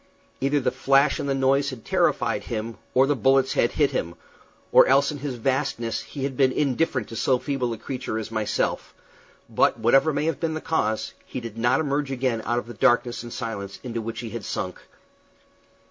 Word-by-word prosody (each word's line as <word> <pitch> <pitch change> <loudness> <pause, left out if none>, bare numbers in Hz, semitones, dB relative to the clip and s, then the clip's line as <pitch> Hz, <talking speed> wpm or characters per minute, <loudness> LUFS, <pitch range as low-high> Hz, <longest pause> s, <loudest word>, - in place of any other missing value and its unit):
Either 140 +2 +2
the 130 - 0
flash 140 +1 +3
and 140 - -2
the 135 - +1
noise 135 +1 +2
had 125 -5 -9
terrified - - +1
him, 115 0 -4 0.2
or 130 +1 +6
the 145 +1 +1
bullets 135 0 +3
had 120 - +2
hit 145 -3 +2
him, 85 +1 -3 0.6
or - - +7
else 140 +2 +4
in 145 - -6
his 140 -2 -4
vastness 120 -2 -1
he 140 - -7
had 135 -1 -2
been 130 0 +3
indifferent 135 -3 0
to 115 - -9
so 130 +3 +2
feeble 130 -2 -2
a 115 - -4
creature 125 -2 -4
as 110 0 -5
myself; 110 -2 -1 0.5
but - - +2
whatever 135 +7 +4
may 145 +1 -1
have 160 -4 -1
been 160 -2 -1
the - - -2
cause, 110 -10 -1
he - - -6
did 115 -3 -8
not 120 +3 +2
emerge 145 -2 -1
again 130 -3 -1
out 120 - 0
of 120 - -2
the 120 - -9
darkness 120 +2 +2
and 120 0 -9
silence 100 -6 -5
into 115 -3 -4
which 115 +1 -5
he 115 -2 -6
had 115 - -5
sunk. 90 -1 -4
130 Hz, 205 wpm, -24 LUFS, 115-140 Hz, 0.6 s, or